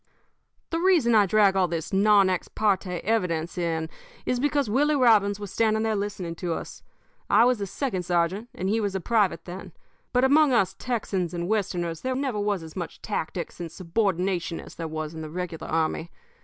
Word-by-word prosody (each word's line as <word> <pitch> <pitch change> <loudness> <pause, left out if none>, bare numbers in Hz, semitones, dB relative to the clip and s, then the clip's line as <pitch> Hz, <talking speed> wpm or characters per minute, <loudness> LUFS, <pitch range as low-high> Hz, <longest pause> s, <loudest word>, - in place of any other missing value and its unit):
"The 330 - 0
reason 335 -10 +4
I 210 -3 +5
drag 200 -1 +4
all 185 -2 +3
this 165 +1 -4
non 200 0 +5
ex 185 -2 -1
parte 190 -4 0
evidence 180 -7 0
in 165 -2 -1 0.4
is 250 - 0
because 285 -1 +1
Willie 290 +8 +2
Robbins 210 -6 +4
was 205 -2 -7
standing 220 -1 +1
there 220 -1 +1
listening 200 -4 -3
to 175 -1 -2
us. - - -8 0.5
I 230 - +6
was 245 -4 +2
a 200 - -2
second 195 -2 -2
sergeant 180 +6 0
and 185 - -3
he 220 +3 +1
was 200 -2 -2
a - - 0
private 200 -5 +1
then, 180 +1 -8 0.4
but 250 0 +2
among 285 +1 +5
us 195 -5 +2
Texans 195 -8 -2
and 170 0 -3
Westerners 180 -6 -1
there 260 0 -1
never 260 -5 -1
was 205 -4 -1
as 160 -1 -11
much 175 -3 -6
tactics 175 -5 -4
and 170 -2 -5
subordination 180 -1 -1
as - - -11
there 165 - -5
was 155 0 -5
in 160 - -7
the 155 - -6
regular 175 0 -5
army. 160 +1 -1
195 Hz, 195 wpm, -26 LUFS, 175-225 Hz, 0.5 s, I